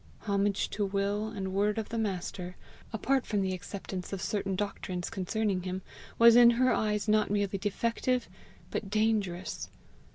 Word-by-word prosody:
Homage 200 Hz, -1 st, +1 dB
to 210 Hz, -, -1 dB
will 200 Hz, +2 st, 0 dB
and 195 Hz, -4 st, -4 dB
word 205 Hz, +2 st, +1 dB
of 220 Hz, -, -3 dB
the 230 Hz, -, -3 dB
Master, 185 Hz, -3 st, -3 dB, 0.4 s
apart 260 Hz, +4 st, +1 dB
from 205 Hz, -2 st, -1 dB
the 190 Hz, -1 st, -1 dB
acceptance 185 Hz, 0 st, -6 dB
of 195 Hz, -, -3 dB
certain 195 Hz, -1 st, -1 dB
doctrines 185 Hz, -3 st, -3 dB
concerning 195 Hz, 0 st, -1 dB
him, 185 Hz, +1 st, -4 dB, 0.3 s
was 230 Hz, 0 st, +8 dB
in 240 Hz, -1 st, +9 dB
her 255 Hz, 0 st, +4 dB
eyes 210 Hz, 0 st, 0 dB
not 215 Hz, 0 st, +3 dB
merely 200 Hz, -1 st, 0 dB
defective 230 Hz, +5 st, 0 dB, 0.4 s
but 200 Hz, -, -3 dB
dangerous. 205 Hz, -4 st, 0 dB
205 Hz, 155 wpm, -30 LUFS, 190-220 Hz, 0.4 s, in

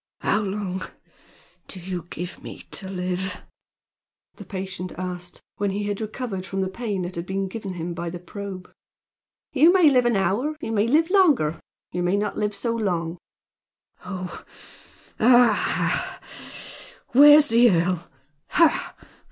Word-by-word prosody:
"How -, -, +2 dB
long 195 Hz, -2 st, -3 dB, 0.9 s
do 190 Hz, -, -8 dB
you 175 Hz, -1 st, -5 dB
give 175 Hz, +2 st, -6 dB
me -, -, -9 dB
to 190 Hz, -, -4 dB
live?" 185 Hz, 0 st, -3 dB, 0.9 s
the -, -, -11 dB
patient 185 Hz, -2 st, -5 dB
asked, 180 Hz, -1 st, -6 dB
when 205 Hz, 0 st, 0 dB
he 200 Hz, +2 st, -2 dB
had 205 Hz, +1 st, -3 dB
recovered 215 Hz, -3 st, -4 dB
from 195 Hz, 0 st, -3 dB
the 190 Hz, -, -1 dB
pain 205 Hz, -3 st, -3 dB
that 175 Hz, +1 st, -5 dB
had 170 Hz, 0 st, -5 dB
been 195 Hz, 0 st, -1 dB
given 195 Hz, -2 st, -6 dB
him 170 Hz, 0 st, -4 dB
by 170 Hz, 0 st, -4 dB
the 175 Hz, -, -6 dB
probe. 185 Hz, +1 st, -8 dB, 0.8 s
"You 310 Hz, +5 st, +6 dB
may 355 Hz, -5 st, +6 dB
live 250 Hz, -2 st, +4 dB
an 240 Hz, -, +2 dB
hour; 200 Hz, -, 0 dB
you 310 Hz, -, -4 dB
may 215 Hz, 0 st, +2 dB
live 320 Hz, +7 st, +3 dB
longer, 320 Hz, -, +4 dB
and 160 Hz, -, -9 dB, 0.3 s
you 180 Hz, -, -2 dB
may 180 Hz, +3 st, +1 dB
not 210 Hz, 0 st, -1 dB
live 210 Hz, -1 st, -1 dB
so 230 Hz, +2 st, -1 dB
long." 175 Hz, -6 st, -2 dB, 0.8 s
"Oh! 185 Hz, -2 st, -6 dB, 0.8 s
Aha! 240 Hz, -1 st, +6 dB
ha! -, -, -1 dB
ha! -, -, -10 dB
Where's 295 Hz, +3 st, +8 dB
the 235 Hz, +1 st, +6 dB
earl? 175 Hz, -2 st, 0 dB, 0.4 s
Ha! 330 Hz, -3 st, +3 dB
195 Hz, 155 wpm, -24 LUFS, 180-230 Hz, 0.9 s, Where's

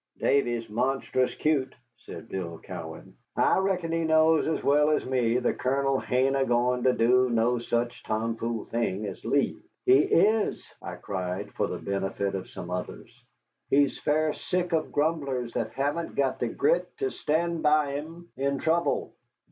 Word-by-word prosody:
"Davy's 120 Hz, -4 st, +1 dB
monstrous 130 Hz, +3 st, 0 dB
cute," 150 Hz, -4 st, 0 dB, 0.2 s
said 115 Hz, -, -11 dB
Bill 85 Hz, -5 st, -5 dB
Cowan; -, -, -9 dB, 0.2 s
"I -, -, +3 dB
reckon 185 Hz, -3 st, 0 dB
he 165 Hz, 0 st, 0 dB
knows 160 Hz, 0 st, +4 dB
as 160 Hz, -, -1 dB
well 150 Hz, +2 st, +4 dB
as 155 Hz, -, +1 dB
me 125 Hz, -2 st, +1 dB
the 125 Hz, -, +1 dB
Colonel 135 Hz, +1 st, 0 dB
hain't 130 Hz, +2 st, +1 dB
a 135 Hz, -, +2 dB
goin' 125 Hz, 0 st, +1 dB
to 130 Hz, -, +5 dB
do 125 Hz, +2 st, +3 dB
no 120 Hz, +1 st, +2 dB
such 120 Hz, +1 st, -2 dB
tomfool 115 Hz, +1 st, -2 dB
thing 110 Hz, -3 st, -2 dB
as 95 Hz, -3 st, -7 dB
leave." -, -, 0 dB, 0.2 s
"He 130 Hz, +2 st, +6 dB
is," 210 Hz, +8 st, +2 dB
I -, -, -6 dB
cried, 95 Hz, +1 st, -4 dB
for -, -, 0 dB
the -, -, -4 dB
benefit 100 Hz, 0 st, -2 dB
of 95 Hz, -1 st, -5 dB
some 90 Hz, 0 st, -8 dB
others, 90 Hz, 0 st, -6 dB, 0.6 s
"he's 140 Hz, 0 st, +3 dB
fair 155 Hz, +1 st, +1 dB
sick 180 Hz, -1 st, -2 dB
of 160 Hz, -1 st, 0 dB
grumblers 140 Hz, -6 st, -1 dB
that 110 Hz, -, -2 dB
haven't 145 Hz, +5 st, -2 dB
got 135 Hz, -2 st, 0 dB
the -, -, 0 dB
grit 455 Hz, +5 st, +1 dB
to 405 Hz, -1 st, -1 dB
stand 165 Hz, -, -1 dB
by 150 Hz, -1 st, +3 dB
him 165 Hz, +5 st, -7 dB
in 140 Hz, +1 st, -1 dB
trouble." 165 Hz, +4 st, 0 dB
135 Hz, 165 wpm, -27 LUFS, 115-155 Hz, 0.6 s, He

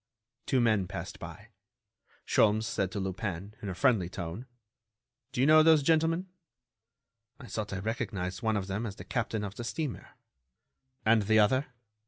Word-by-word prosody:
Two 130 Hz, -, +2 dB
men 110 Hz, -6 st, +2 dB
passed 95 Hz, +1 st, -6 dB
by. -, -, -10 dB, 0.8 s
Sholmes 110 Hz, 0 st, +3 dB
said 100 Hz, -5 st, -1 dB
to 100 Hz, -, -3 dB
Lupin, 95 Hz, 0 st, -4 dB
in 100 Hz, -, -4 dB
a 95 Hz, -, -4 dB
friendly 110 Hz, -8 st, +2 dB
tone: 90 Hz, +7 st, -6 dB, 0.8 s
"Do 125 Hz, -, -1 dB
you -, -, +5 dB
know 155 Hz, +1 st, +7 dB
those 155 Hz, -2 st, +5 dB
gentlemen?" 165 Hz, +4 st, +2 dB, 1.1 s
"I 135 Hz, -, -10 dB
thought 110 Hz, -3 st, -4 dB
I 100 Hz, -, -3 dB
recognized 95 Hz, -3 st, -3 dB
one 110 Hz, -2 st, +1 dB
of 100 Hz, -, -2 dB
them 100 Hz, +4 st, -3 dB
as 100 Hz, -, -6 dB
the -, -, -9 dB
captain 110 Hz, -3 st, -2 dB
of 100 Hz, -1 st, -4 dB
the 120 Hz, -, -4 dB
steamer." 145 Hz, +3 st, -4 dB, 0.9 s
"And 110 Hz, 0 st, +5 dB
the 110 Hz, +2 st, +3 dB
other?" 130 Hz, +7 st, +3 dB
110 Hz, 165 wpm, -30 LUFS, 95-130 Hz, 1.1 s, know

